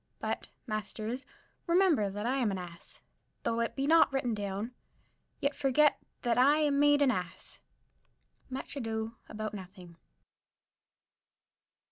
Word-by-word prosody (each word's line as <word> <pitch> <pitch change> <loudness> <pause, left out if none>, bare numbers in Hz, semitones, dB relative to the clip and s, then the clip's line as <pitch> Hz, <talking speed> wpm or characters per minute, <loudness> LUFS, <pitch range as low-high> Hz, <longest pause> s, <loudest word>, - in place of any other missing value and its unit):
but, - - -3 0.2
masters, 220 +2 -4 0.4
remember 340 - +4
that 205 +2 -4
I 260 +3 +1
am 245 -5 +2
an 195 - -2
ass; 175 -2 -10 0.4
though 230 - 0
it 230 - -1
be 275 - 0
not 325 0 +6
written 265 -3 0
down, 205 +2 -3 0.7
yet 280 +1 +1
forget 290 +2 +3
not - - -39
that 240 -2 +2
I 285 +4 +6
am 290 -2 +2
made 290 0 +5
an 270 - +4
ass. 180 -5 -5 0.9
_Much 260 - -5
Ado 225 -3 -3
About 215 0 -4
Nothing. 185 -3 -10
235 Hz, 135 wpm, -31 LUFS, 205-280 Hz, 0.9 s, not